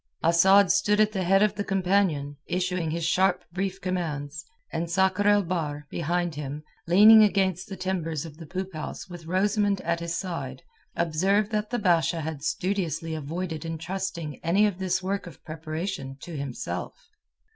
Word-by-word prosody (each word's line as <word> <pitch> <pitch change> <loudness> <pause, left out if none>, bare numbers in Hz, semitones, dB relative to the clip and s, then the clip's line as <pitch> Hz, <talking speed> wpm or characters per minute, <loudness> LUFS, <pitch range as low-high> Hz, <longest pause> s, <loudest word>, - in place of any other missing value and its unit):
Asad 190 +4 +6
stood 205 +1 +2
at 215 0 +4
the 190 -3 -2
head 195 +3 +4
of 210 - +2
the 205 - -3
companion, 185 -7 +1
issuing 180 -2 -1
his 165 +1 -2
sharp 190 +3 +2
brief 195 +1 -2
commands, 160 -5 -3 0.3
and 165 +1 -2
Sakr 190 +3 +2
el 205 -1 +5
Bahr, 155 -5 -3
behind 175 +1 -1
him, 145 0 -6 0.2
leaning 210 +5 +8
against 190 -3 +1
the 195 - -6
timbers 170 -5 -2
of 155 -2 -10
the 165 -2 -10
poop 190 +3 -5
house 155 - -6
with 175 -3 -10
Rosamund 200 +2 +1
at 170 - -1
his 170 0 -3
side, 140 -8 -5 0.3
observed 190 +6 +1
that 210 -1 -1
the 245 - -1
Basha 170 -5 +2
had 155 -2 -5
studiously 165 -1 -2
avoided 160 +1 -4
entrusting 165 -1 -4
any 185 +6 +3
of 200 -3 -1
this 185 -1 0
work 195 0 -2
of 165 - -13
preparation 155 -3 -5
to 170 - -8
himself. 140 -4 -4
175 Hz, 165 wpm, -26 LUFS, 160-195 Hz, 0.3 s, leaning